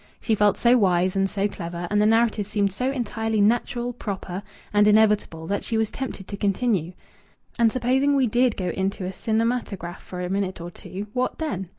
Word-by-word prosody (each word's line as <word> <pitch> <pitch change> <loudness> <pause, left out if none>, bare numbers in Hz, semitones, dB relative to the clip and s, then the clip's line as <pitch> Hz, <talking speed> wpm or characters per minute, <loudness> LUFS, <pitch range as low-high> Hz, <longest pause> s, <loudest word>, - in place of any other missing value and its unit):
She 225 - 0
felt 205 -2 +3
so 245 +1 +4
wise 185 -2 +2
and 195 0 +2
so 200 +1 0
clever 175 -3 -6
and 210 0 +3
the 210 - +4
narrative 225 -2 +2
seemed 205 -2 0
so 250 +7 -1
entirely 225 -4 -1
natural, 240 +3 +1
proper, 195 -5 -5 0.3
and 205 0 +5
inevitable 210 -6 +3
that 200 +4 -2
she 225 - -1
was 220 -1 0
tempted 255 -8 -6
to 200 - -6
continue 200 -4 0 0.7
"And 230 -1 +5
supposing 260 +4 +2
we 270 -2 +3
did 245 +1 +2
go 185 -2 -2
into 190 +1 -2
a 185 - -4
cinematograph 220 -5 -2
for 180 - -8
a 180 - -2
minute 190 0 -2
or 170 +1 -7
two 195 +3 -7
what 255 0 -1
then?" 195 - -3
210 Hz, 195 wpm, -24 LUFS, 190-235 Hz, 0.7 s, and